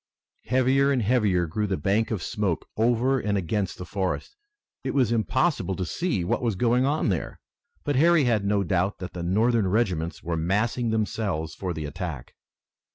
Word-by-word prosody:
Heavier 130 +3 +3
and 130 -4 +1
heavier 105 -6 +2
grew 105 +6 -2
the 95 -2 -1
bank 110 +3 +1
of 105 -7 -2
smoke 100 -6 -2
over 120 +4 +2
and 105 -2 0
against 95 +1 -2
the 90 - -7
forest. 95 - -3 0.5
It - - -3
was 125 -5 +3
impossible 115 - +1
to 95 - -2
see 160 - -1
what 85 - 0
was 115 -4 0
going 120 +5 +2
on 145 -4 +1
there, 90 -5 -3 0.4
but 145 -2 0
Harry 165 +1 +5
had 115 -5 +2
no 100 0 +1
doubt 95 +2 0
that 90 - -7
the 90 - -5
Northern 110 +4 +2
regiments 90 -6 -1
were 85 0 -2
massing 105 +8 0
themselves 105 -7 -1
for 95 -2 -4
the 80 -3 -4
attack. 75 -4 -6
105 Hz, 175 wpm, -26 LUFS, 90-120 Hz, 0.5 s, Harry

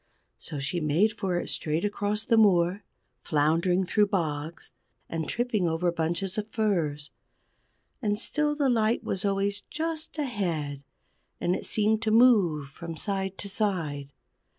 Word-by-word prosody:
So 150 - -6
she 145 +5 -2
made 165 +9 +2
for 185 -2 -1
it - - -3
straight 155 +4 0
across 205 +1 -1
the 230 - +2
moor, 190 -3 +4 0.4
floundering 165 +5 +2
through 210 +3 +3
bogs, 160 -4 -3 0.4
and 160 -1 -3
tripping 235 -6 0
over 165 +2 +1
bunches 170 +4 -1
of 210 - -4
furze. 165 -11 -1 0.9
And 205 -3 0
still 295 +5 0
the 290 -2 +1
light 225 -2 +2
was 190 - -2
always 200 0 0
just 320 +1 -4
ahead, 170 - -2 0.6
and 180 - +1
it - - -4
seemed 215 +1 +2
to 225 - 0
move 210 - +4
from 165 +3 -8
side 195 -1 -2
to 200 - -5
side. 165 -9 -2
190 Hz, 145 wpm, -27 LUFS, 165-215 Hz, 0.9 s, moor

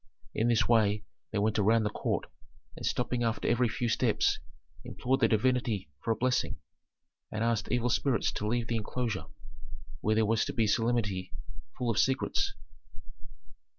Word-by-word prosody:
In 115 - +1
this 120 -1 +3
way 105 -3 +3 0.3
they 110 - -3
went 105 +1 +1
around 110 +2 +4
the 105 - -1
court - - -1 0.5
and - - -9
stopping 125 0 -1
after 115 -1 0
every 120 0 +3
few 120 +1 -2
steps, 110 - +2 0.4
implored 130 +2 -1
the - - +5
divinity 110 - +1
for - - -4
a 115 - +3
blessing, 125 +3 0 0.8
and 110 +1 -2
asked 115 -2 0
evil 125 -1 +1
spirits 120 -5 +1
to 105 0 -3
leave 120 +1 0
the 115 0 -1
enclosure, 115 +1 -2 0.7
where 110 +1 +1
there 110 0 +3
was 110 +1 +2
to - - -4
be 115 - +2
a - - +2
solemnity 110 -4 0 0.5
full 125 -2 0
of 110 - 0
secrets. 130 0 +1
115 Hz, 165 wpm, -30 LUFS, 110-120 Hz, 0.8 s, the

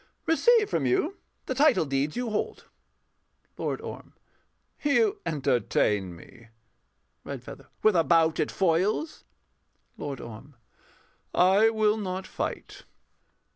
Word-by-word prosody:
Receive 440 +6 +4
from 145 - 0
you 310 - 0 0.3
the - - -2
title 285 - +4
deeds 140 +1 -1
you 245 -2 -2
hold. 210 - -3 0.9
LORD - - -3
ORM. - - -9 0.7
You 400 +8 +2
entertain 115 - 0
me. 115 +7 -16 0.8
REDFEATHER. - - -9 0.2
With 215 -3 +5
a 165 - +4
bout 165 -1 +3
at - - +1
foils? 190 - 0 0.7
LORD 140 -3 -5
ORM. 120 +5 -10 0.8
I 195 +5 +5
will 215 -1 +2
not 190 -2 -4
fight. - - -6
185 Hz, 110 wpm, -27 LUFS, 140-235 Hz, 0.9 s, With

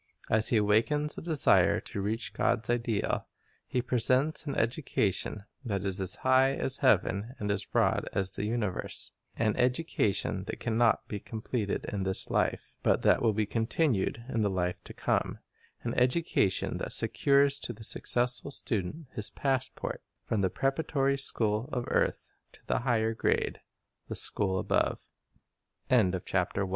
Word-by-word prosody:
As 110 0 +4
he 115 - +3
awakens 115 +9 +2
a - - -7
desire 160 -4 +4
to 100 - -6
reach 105 0 -2
God's 115 +1 0
ideal, 115 -3 -1 0.4
he 125 - -1
presents 130 +6 +1
an 140 - -2
education 110 - -1 0.2
that 100 -6 -2
is 95 0 0
as 95 - +1
high 130 +1 +4
as 130 - +1
heaven 105 +4 +2
and 105 0 -2
as 100 - -1
broad - - +1
as 95 -1 0
the 100 - -2
universe; 105 -4 -2 0.2
an 110 -2 +1
education 125 - 0
that - - -6
can 115 - -2
not 115 -1 +3
be 105 - -4
completed 110 -1 -3
in 100 - -2
this 95 0 -2
life, - - 0
but - - +2
that - - +4
will 115 - +3
be 105 +1 0
continued 115 - 0
in 115 -4 -1
the 105 - +2
life 90 -2 -2
to - - -9
come; - - 0 0.5
an 120 - -2
education 125 - +1
that - - -2
secures 140 0 +3
to - - -2
the 110 -1 -11
successful 125 +4 +2
student 120 - -2
his 105 - -3
passport 130 -1 -2 0.2
from 110 - -1
the 95 - +2
preparatory 135 - 0
scho 115 -3 -1
115 Hz, 130 wpm, -29 LUFS, 105-130 Hz, 0.5 s, As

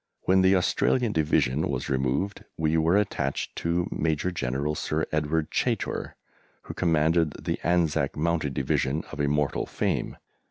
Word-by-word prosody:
When 95 0 +3
the 95 +1 +5
Australian 115 +6 +2
Division 75 -4 +1
was 65 -3 -2
removed 70 +9 -1
we 80 0 +1
were 80 +4 +3
attached 80 -9 -1
to 85 +1 0
Major 80 +3 0
General 70 -1 -2
Sir 75 +1 -1
Edward 75 0 0
Chaytor, - - -1 0.5
who - - -7
commanded 80 -2 +2
the - - -2
Anzac 85 -3 +1
Mounted 80 -3 0
Division 65 +3 0
of 75 - -8
immortal 75 0 0
fame. - - -2
80 Hz, 135 wpm, -26 LUFS, 70-85 Hz, 0.5 s, the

